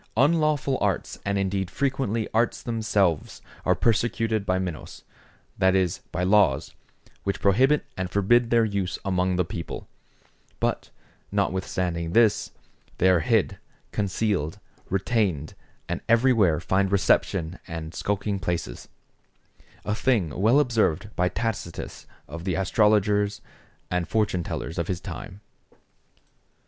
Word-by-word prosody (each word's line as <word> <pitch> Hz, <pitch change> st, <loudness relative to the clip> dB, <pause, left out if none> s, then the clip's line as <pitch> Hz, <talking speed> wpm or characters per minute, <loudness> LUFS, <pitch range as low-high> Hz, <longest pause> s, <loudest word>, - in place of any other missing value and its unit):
Unlawful 145 Hz, -1 st, +2 dB
arts 100 Hz, -3 st, -1 dB
and 100 Hz, 0 st, 0 dB
indeed 95 Hz, -1 st, -1 dB
frequently 130 Hz, -2 st, -1 dB
arts 115 Hz, +1 st, +1 dB
themselves, 105 Hz, -8 st, 0 dB, 0.2 s
are -, -, +3 dB
persecuted 115 Hz, -2 st, +1 dB
by 95 Hz, -, +2 dB
Minos, 90 Hz, -4 st, -5 dB, 0.6 s
that 95 Hz, 0 st, +4 dB
is, 95 Hz, -1 st, +1 dB
by 90 Hz, -, -2 dB
laws, 90 Hz, -7 st, +3 dB, 0.5 s
which 100 Hz, -, -2 dB
prohibit 130 Hz, +9 st, +3 dB
and 95 Hz, -1 st, -3 dB
forbid 115 Hz, +5 st, +3 dB
their 115 Hz, -1 st, +4 dB
use 100 Hz, -4 st, -2 dB
among 95 Hz, -1 st, +1 dB
the 90 Hz, -1 st, +1 dB
people; 85 Hz, -1 st, -6 dB, 0.7 s
but -, -, -1 dB, 0.4 s
notwithstanding 90 Hz, -3 st, -1 dB
this, 115 Hz, -1 st, +3 dB, 0.5 s
they 95 Hz, -, +4 dB
are 90 Hz, -, +4 dB
hid, 80 Hz, -, +1 dB, 0.3 s
concealed, 100 Hz, -5 st, -1 dB, 0.3 s
retained, 95 Hz, -, 0 dB, 0.3 s
and -, -, -3 dB
everywhere 115 Hz, -8 st, +4 dB
find 95 Hz, +2 st, +1 dB
reception 90 Hz, -3 st, +1 dB
and 80 Hz, -2 st, -6 dB
skulking 100 Hz, 0 st, -2 dB
places; 85 Hz, -10 st, -4 dB, 1.0 s
a 105 Hz, -, 0 dB
thing 105 Hz, -, +1 dB
well 110 Hz, -, +3 dB
observed 110 Hz, -, +1 dB
by 90 Hz, 0 st, +2 dB
Tacitus 105 Hz, -4 st, -4 dB, 0.2 s
of 85 Hz, 0 st, -7 dB
the 90 Hz, -2 st, -1 dB
astrologers 105 Hz, +1 st, +2 dB, 0.5 s
and 90 Hz, -1 st, 0 dB
fortune 105 Hz, -5 st, +1 dB
tellers 80 Hz, +1 st, -4 dB
of 85 Hz, -, -1 dB
his 90 Hz, -2 st, -2 dB
time. 95 Hz, +1 st, -8 dB
100 Hz, 120 wpm, -25 LUFS, 90-110 Hz, 1.0 s, that